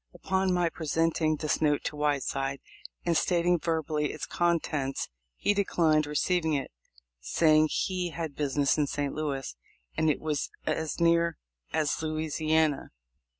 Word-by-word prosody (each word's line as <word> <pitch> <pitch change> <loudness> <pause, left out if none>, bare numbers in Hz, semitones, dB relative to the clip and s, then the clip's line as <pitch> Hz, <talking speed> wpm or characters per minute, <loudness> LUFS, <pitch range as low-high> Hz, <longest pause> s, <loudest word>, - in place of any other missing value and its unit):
Upon 190 0 0
my 175 -1 +2
presenting 160 0 0
this 155 +1 -1
note 150 -2 +2
to - - -3
Whiteside, 140 -2 -1 0.5
and 170 -1 +2
stating 175 +1 +2
verbally 155 -2 -1
its 155 - -5
contents, 160 -5 -1 0.3
he 205 - +1
declined 160 -6 +2
receiving 160 +1 +1
it, 135 - -3 0.5
saying 155 - +3
he 180 -2 -1
had 160 -3 -5
business 145 0 +1
in 145 - +2
St. 145 -1 -2
Louis, 140 - -3 0.4
and 160 - +2
it 150 - +1
was 150 -2 -2 0.2
as 160 +1 -2
near 170 0 +3 0.3
as 155 +1 0
Louisiana. 155 -1 0
155 Hz, 135 wpm, -29 LUFS, 150-170 Hz, 0.5 s, saying